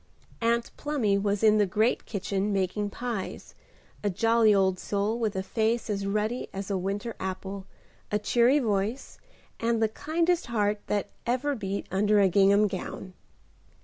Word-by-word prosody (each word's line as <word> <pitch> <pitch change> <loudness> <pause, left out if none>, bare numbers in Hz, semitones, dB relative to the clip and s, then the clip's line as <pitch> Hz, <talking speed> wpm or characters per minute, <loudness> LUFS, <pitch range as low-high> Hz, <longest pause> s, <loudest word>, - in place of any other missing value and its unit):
Aunt 235 0 +1
Plumy 265 -9 0
was 205 +1 -1
in 215 -1 +5
the 205 - +3
great 215 +6 +1
kitchen 200 0 -2
making 195 +1 -1
pies; 230 -2 -5 0.5
a 205 - +2
jolly 225 +3 +3
old 190 -2 +2
soul, 205 +3 -1
with 220 -4 -1
a 190 - -1
face 225 +2 0
as 200 -1 -2
ruddy 215 +4 -1
as 195 +1 -5
a 195 - +1
winter 200 +5 -3
apple, 190 +1 -5 0.4
a 210 - +2
cheery 240 +6 +3
voice, 220 0 -1 0.4
and 230 0 +1
the 220 - +3
kindest 330 +8 0
heart 210 -3 0
that 205 -2 -1 0.2
ever 255 +4 +1
beat 200 -5 -3
under 205 +2 +3
a 195 -1 +5
gingham 200 +3 +5
gown. 185 -1 -6
210 Hz, 155 wpm, -27 LUFS, 195-230 Hz, 0.5 s, in